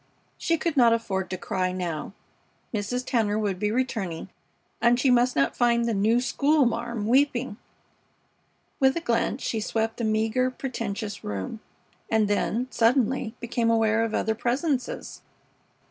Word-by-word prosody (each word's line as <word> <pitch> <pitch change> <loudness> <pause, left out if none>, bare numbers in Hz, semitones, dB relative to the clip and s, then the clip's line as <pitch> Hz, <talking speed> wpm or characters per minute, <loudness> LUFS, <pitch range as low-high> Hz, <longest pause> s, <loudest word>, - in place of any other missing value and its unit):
She 330 - 0
could 330 -1 -2
not 240 -4 +6
afford 195 -5 -2
to 185 - -3
cry 185 0 -1
now. 180 -1 -4 0.6
Mrs. 230 +4 -2
Tanner 215 -4 +1
would 200 -4 -1
be 210 - 0
returning, 215 -8 -2 0.5
and 240 +1 +4
she 260 0 +3
must 245 +1 +3
not 140 0 +1
find 235 -1 +2
the 230 - 0
"new 215 +4 +3
schoolma'am" 240 -4 +1
weeping. 255 -2 +2 1.2
With 265 +2 +3
a - - +1
glance 240 -3 -1
she 225 - -1
swept 225 +1 -1
the 235 - -3
meager, 220 +3 +1
pretentious 225 -5 -5
room, 100 - -4 0.5
and 220 -2 +3
then, 210 +4 0
suddenly, 240 0 +2
became 235 -1 0
aware 225 -1 +3
of 225 - -2
other 220 - +1
presences. 250 +3 -2
230 Hz, 145 wpm, -26 LUFS, 210-250 Hz, 1.2 s, not